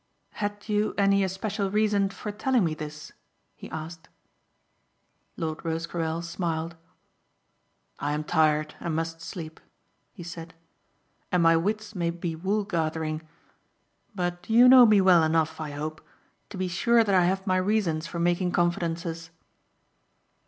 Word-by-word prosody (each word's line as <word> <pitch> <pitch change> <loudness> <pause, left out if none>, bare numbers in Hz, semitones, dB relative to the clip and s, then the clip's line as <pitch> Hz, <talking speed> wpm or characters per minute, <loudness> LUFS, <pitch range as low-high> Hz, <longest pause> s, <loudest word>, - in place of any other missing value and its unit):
"Had 205 0 -5
you 210 0 0
any 200 0 +3
especial 195 +1 -2
reason 205 -1 +2
for 210 +2 -6
telling 235 +2 +1
me 160 - -1
this?" 150 -1 -8 0.4
he - - -11
asked. 160 +1 -8 1.3
Lord 160 -1 -4
Rosecarrel 165 0 -3
smiled. 165 -1 -3 1.2
"I 145 0 -1
am 150 +1 -2
tired 155 -1 +2
and 165 -2 -3
must 165 0 -3
sleep," 160 -2 -8 0.5
he 180 - -10
said, 165 0 -9 0.8
"and 180 -2 +3
my 165 0 +6
wits 210 +5 -1
may 170 -4 -1
be 170 -1 -4
wool 195 +6 -1
gathering; 160 -4 -2 0.9
but 175 0 -3
you 235 +3 +7
know 250 -1 +9
me 210 -2 +5
well 185 -3 +6
enough, 160 0 +1
I 155 - -4
hope, 155 +2 -5 0.5
to - - -8
be 185 0 -1
sure 230 +6 +3
that 205 -3 0
I 180 -2 +5
have 190 +2 0
my 185 -2 +2
reasons 185 -5 0
for 170 - -6
making 175 +1 +1
confidences." 170 -1 -1
175 Hz, 140 wpm, -26 LUFS, 160-200 Hz, 1.3 s, know